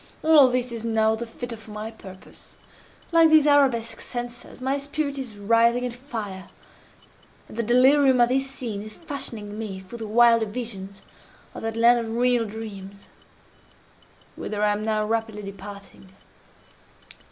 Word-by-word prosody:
All 305 Hz, -4 st, +7 dB
this 250 Hz, 0 st, -1 dB
is 230 Hz, -1 st, -6 dB
now 220 Hz, -1 st, +2 dB
the 230 Hz, +1 st, -4 dB
fitter 240 Hz, +1 st, -7 dB
for 220 Hz, 0 st, -15 dB
my 215 Hz, +1 st, -6 dB
purpose. 190 Hz, -4 st, -13 dB, 0.6 s
Like 330 Hz, -1 st, +6 dB
these 310 Hz, -2 st, +6 dB
arabesque 265 Hz, -6 st, +3 dB
censers, 240 Hz, 0 st, -7 dB
my 265 Hz, +2 st, -1 dB
spirit 285 Hz, 0 st, -3 dB
is 240 Hz, -6 st, -7 dB
writhing 230 Hz, +4 st, +3 dB
in 250 Hz, -, -2 dB
fire, 225 Hz, -7 st, -7 dB, 1.0 s
and -, -, -12 dB
the 235 Hz, -, 0 dB
delirium 260 Hz, +3 st, +4 dB
of 240 Hz, 0 st, +5 dB
this 270 Hz, +1 st, 0 dB
scene 230 Hz, -6 st, -5 dB
is 215 Hz, 0 st, -8 dB
fashioning 230 Hz, -9 st, -6 dB
me 200 Hz, -4 st, -5 dB
for 190 Hz, +5 st, -10 dB
the 225 Hz, -2 st, -6 dB
wilder 230 Hz, 0 st, +4 dB
visions 205 Hz, -4 st, -7 dB, 0.5 s
of -, -, -8 dB
that 225 Hz, 0 st, -4 dB
land 240 Hz, +1 st, +5 dB
of 225 Hz, -1 st, -4 dB
real 245 Hz, -1 st, +2 dB
dreams 200 Hz, -2 st, -9 dB, 1.3 s
whither 210 Hz, 0 st, -4 dB
I 210 Hz, -, +3 dB
am 205 Hz, +1 st, -2 dB
now 215 Hz, -1 st, 0 dB
rapidly 220 Hz, -1 st, -2 dB
departing." 200 Hz, 0 st, -10 dB
230 Hz, 150 wpm, -24 LUFS, 210-250 Hz, 1.3 s, All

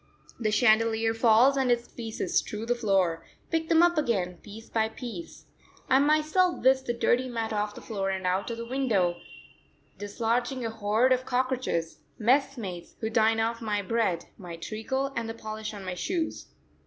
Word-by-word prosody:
The 220 Hz, -3 st, 0 dB
chandelier 225 Hz, 0 st, +3 dB
falls 230 Hz, +4 st, +5 dB
and 265 Hz, -2 st, +2 dB
its 240 Hz, 0 st, +1 dB
pieces 225 Hz, -5 st, -5 dB
strew 215 Hz, +1 st, 0 dB
the 240 Hz, -, +2 dB
floor; 190 Hz, -8 st, +1 dB, 0.3 s
pick 325 Hz, 0 st, 0 dB
them 330 Hz, +1 st, +5 dB
up 345 Hz, -2 st, +4 dB
again 190 Hz, -, -1 dB
piece 215 Hz, +5 st, -12 dB
by 220 Hz, -1 st, 0 dB
piece. 250 Hz, +8 st, -8 dB, 0.5 s
I 265 Hz, -, +6 dB
myself 310 Hz, +5 st, +2 dB
whisk 265 Hz, 0 st, +4 dB
the 240 Hz, -, -1 dB
dirty 250 Hz, +2 st, +1 dB
mat 225 Hz, -2 st, -3 dB
off 210 Hz, 0 st, -2 dB
the -, -, -9 dB
floor 195 Hz, -4 st, -2 dB
and 190 Hz, -1 st, -3 dB
out 185 Hz, +4 st, 0 dB
of 230 Hz, -, -4 dB
the 235 Hz, -, -5 dB
window, 225 Hz, -9 st, +1 dB, 0.8 s
dislodging 235 Hz, +5 st, -1 dB
a 225 Hz, -, -2 dB
horde 220 Hz, +4 st, +2 dB
of 255 Hz, 0 st, -1 dB
cockroaches, 250 Hz, -12 st, -1 dB, 0.2 s
messmates, 235 Hz, -7 st, 0 dB
who 220 Hz, 0 st, -3 dB
dine 225 Hz, 0 st, +3 dB
off 230 Hz, +1 st, -1 dB
my 210 Hz, -2 st, -1 dB
bread, 205 Hz, -4 st, 0 dB
my 175 Hz, -3 st, -7 dB
treacle, 265 Hz, +10 st, -3 dB
and 230 Hz, -1 st, -2 dB
the 225 Hz, -, -5 dB
polish 215 Hz, -1 st, -6 dB
on 200 Hz, -3 st, -9 dB
my 185 Hz, -, -3 dB
shoes. 330 Hz, -, -3 dB
225 Hz, 175 wpm, -28 LUFS, 210-255 Hz, 0.8 s, I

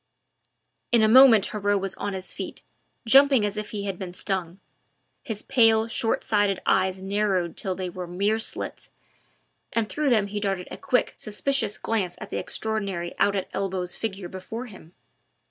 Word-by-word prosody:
In 235 Hz, -2 st, +5 dB
a -, -, +5 dB
moment 230 Hz, -3 st, +7 dB
Heriot 205 Hz, -1 st, 0 dB
was 195 Hz, 0 st, -3 dB
on 205 Hz, -, -4 dB
his 190 Hz, 0 st, -5 dB
feet, -, -, -7 dB, 0.4 s
jumping 270 Hz, 0 st, +6 dB
up -, -, +1 dB
as 205 Hz, -, -8 dB
if 210 Hz, 0 st, -5 dB
he 205 Hz, -2 st, -4 dB
had 195 Hz, -3 st, -4 dB
been 180 Hz, -2 st, -6 dB
stung; 185 Hz, -2 st, -2 dB, 0.6 s
his 220 Hz, -6 st, -5 dB
pale, 225 Hz, -3 st, +4 dB
short 225 Hz, 0 st, +1 dB
sighted 205 Hz, -3 st, +1 dB
eyes 190 Hz, 0 st, +1 dB
narrowed 195 Hz, -3 st, 0 dB
till 190 Hz, -1 st, -2 dB
they 185 Hz, 0 st, -4 dB
were 180 Hz, 0 st, -6 dB
mere 200 Hz, +5 st, 0 dB
slits, -, -, -3 dB, 0.8 s
and 230 Hz, -2 st, 0 dB
through 295 Hz, +5 st, -1 dB
them 220 Hz, -5 st, +3 dB
he 205 Hz, +1 st, -4 dB
darted 195 Hz, -3 st, -2 dB
a -, -, -6 dB
quick, 250 Hz, -, 0 dB
suspicious 215 Hz, +1 st, 0 dB
glance 190 Hz, -6 st, -1 dB
at -, -, -9 dB
the -, -, -2 dB
extraordinary 200 Hz, -6 st, -3 dB
out 205 Hz, -, +3 dB
at 190 Hz, -, -2 dB
elbows 185 Hz, -2 st, -3 dB
figure 195 Hz, -4 st, -4 dB
before 190 Hz, +7 st, -7 dB
him. 185 Hz, -6 st, -14 dB
205 Hz, 175 wpm, -25 LUFS, 190-220 Hz, 0.8 s, moment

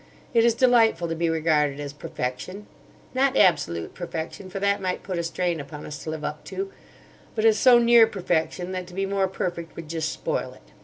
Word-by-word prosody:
It 230 Hz, -, +5 dB
is 235 Hz, -1 st, +4 dB
delightful 230 Hz, -8 st, +4 dB
to 165 Hz, -, -2 dB
be 165 Hz, 0 st, 0 dB
regarded 155 Hz, -3 st, +1 dB
as 145 Hz, -1 st, -5 dB
perfection—not 185 Hz, -, -4 dB
absolute 145 Hz, -, +2 dB
perfection, 170 Hz, +2 st, -6 dB
for 195 Hz, -, -5 dB
that 200 Hz, 0 st, +1 dB
might 185 Hz, -1 st, -2 dB
put 185 Hz, -3 st, -3 dB
a -, -, -1 dB
strain 170 Hz, 0 st, -1 dB
upon 150 Hz, +1 st, -8 dB
us 150 Hz, 0 st, -7 dB
to -, -, -5 dB
live 155 Hz, -1 st, -5 dB
up 150 Hz, 0 st, -4 dB
to, 390 Hz, 0 st, -5 dB, 0.6 s
but 220 Hz, -1 st, 0 dB
as 220 Hz, -1 st, +5 dB
so 250 Hz, -2 st, +7 dB
near 235 Hz, -1 st, +6 dB
perfection 180 Hz, -2 st, -1 dB
that 185 Hz, -1 st, -4 dB
to 180 Hz, -, -12 dB
be 195 Hz, 0 st, 0 dB
more 195 Hz, 0 st, +1 dB
perfect 175 Hz, -3 st, -4 dB
would 165 Hz, -2 st, -8 dB
just 160 Hz, -1 st, -2 dB
spoil -, -, -3 dB
it. -, -, -21 dB
175 Hz, 200 wpm, -25 LUFS, 160-205 Hz, 0.6 s, so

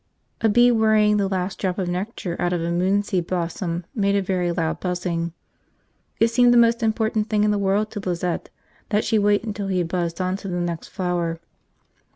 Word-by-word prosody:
A 225 Hz, -, +3 dB
bee 240 Hz, +3 st, +5 dB
worrying 215 Hz, -2 st, +3 dB
the 200 Hz, -1 st, +1 dB
last 190 Hz, 0 st, -3 dB
drop 185 Hz, -2 st, -1 dB
of 190 Hz, -3 st, -1 dB
nectar 180 Hz, 0 st, -3 dB
out 175 Hz, 0 st, 0 dB
of 175 Hz, -, -1 dB
a 170 Hz, -, -1 dB
moonseed 185 Hz, 0 st, 0 dB
blossom 170 Hz, -1 st, -3 dB
made 200 Hz, -2 st, +1 dB
a 200 Hz, -, +2 dB
very 180 Hz, -2 st, 0 dB
loud 165 Hz, -2 st, -1 dB
buzzing. 175 Hz, -2 st, -2 dB, 0.9 s
It 225 Hz, -, +4 dB
seemed 245 Hz, +1 st, +4 dB
the 240 Hz, -, +5 dB
most 235 Hz, 0 st, +4 dB
important 220 Hz, -1 st, 0 dB
thing 210 Hz, -1 st, +2 dB
in 210 Hz, -, +3 dB
the 205 Hz, -, 0 dB
world 200 Hz, +2 st, +1 dB
to 210 Hz, -, -5 dB
Lizette 180 Hz, -2 st, -3 dB, 0.4 s
that 210 Hz, 0 st, +1 dB
she 220 Hz, -, +2 dB
wait 205 Hz, 0 st, +2 dB
until 205 Hz, -3 st, -4 dB
he 190 Hz, -1 st, 0 dB
had 175 Hz, -2 st, 0 dB
buzzed 170 Hz, -1 st, -2 dB
on 185 Hz, +1 st, -1 dB
to 195 Hz, -, -8 dB
the 180 Hz, -1 st, -2 dB
next 170 Hz, -2 st, -3 dB
flower. 175 Hz, -2 st, -2 dB
190 Hz, 200 wpm, -23 LUFS, 175-210 Hz, 0.9 s, bee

